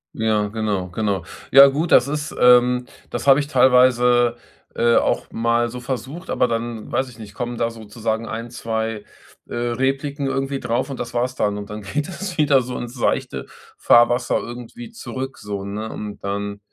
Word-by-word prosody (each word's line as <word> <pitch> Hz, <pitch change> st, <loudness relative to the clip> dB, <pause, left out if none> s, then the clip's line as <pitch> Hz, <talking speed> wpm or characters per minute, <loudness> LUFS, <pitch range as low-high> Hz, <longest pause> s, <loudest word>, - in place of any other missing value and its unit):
Ja, 110 Hz, -2 st, +1 dB
genau. 105 Hz, -3 st, -2 dB
Genau. 100 Hz, -1 st, -1 dB, 0.3 s
Ja 135 Hz, +1 st, +10 dB
gut, 150 Hz, +5 st, -1 dB
das 125 Hz, -, +6 dB
ist, 150 Hz, 0 st, -3 dB
ähm, 125 Hz, 0 st, +5 dB, 0.2 s
das 120 Hz, -, -4 dB
habe 135 Hz, +1 st, +7 dB
ich 145 Hz, -, -2 dB
teilweise, 125 Hz, -2 st, +4 dB, 0.4 s
äh, 120 Hz, 0 st, +3 dB
auch -, -, +1 dB
mal 115 Hz, +1 st, +1 dB
so 125 Hz, +2 st, -7 dB
versucht. 130 Hz, -, -6 dB
Aber 125 Hz, -, +2 dB
dann 115 Hz, -1 st, -4 dB
weiß 130 Hz, 0 st, 0 dB
ich 120 Hz, -2 st, -15 dB
nicht, 105 Hz, -2 st, -11 dB
kommen 120 Hz, -1 st, -4 dB
da 115 Hz, 0 st, 0 dB
sozusagen 110 Hz, 0 st, -4 dB
1, 115 Hz, +1 st, -5 dB
2, 110 Hz, -2 st, -3 dB, 0.4 s
äh, -, -, -7 dB
Repliken 135 Hz, +4 st, -1 dB
irgendwie 135 Hz, 0 st, -1 dB
darauf. 120 Hz, +3 st, -1 dB
Und 135 Hz, -, -6 dB
das 120 Hz, 0 st, -5 dB
war's 125 Hz, +1 st, -1 dB
dann. 105 Hz, -3 st, 0 dB
Und 100 Hz, -, -8 dB
dann 105 Hz, 0 st, -7 dB
geht 145 Hz, +9 st, -3 dB
das 185 Hz, -1 st, -6 dB
wieder 140 Hz, -3 st, +4 dB
so 125 Hz, +1 st, -6 dB
ins 120 Hz, +1 st, -6 dB
seichte 120 Hz, -, -1 dB, 0.3 s
Fahrwasser 120 Hz, +1 st, +4 dB
irgendwie 125 Hz, -, -8 dB
zurück, 135 Hz, -, -6 dB
so, 100 Hz, -1 st, -5 dB
ne? 105 Hz, +3 st, -5 dB
Und 105 Hz, -1 st, -7 dB
dann, 100 Hz, +1 st, -3 dB
120 Hz, 180 wpm, -21 LUFS, 110-130 Hz, 0.4 s, Ja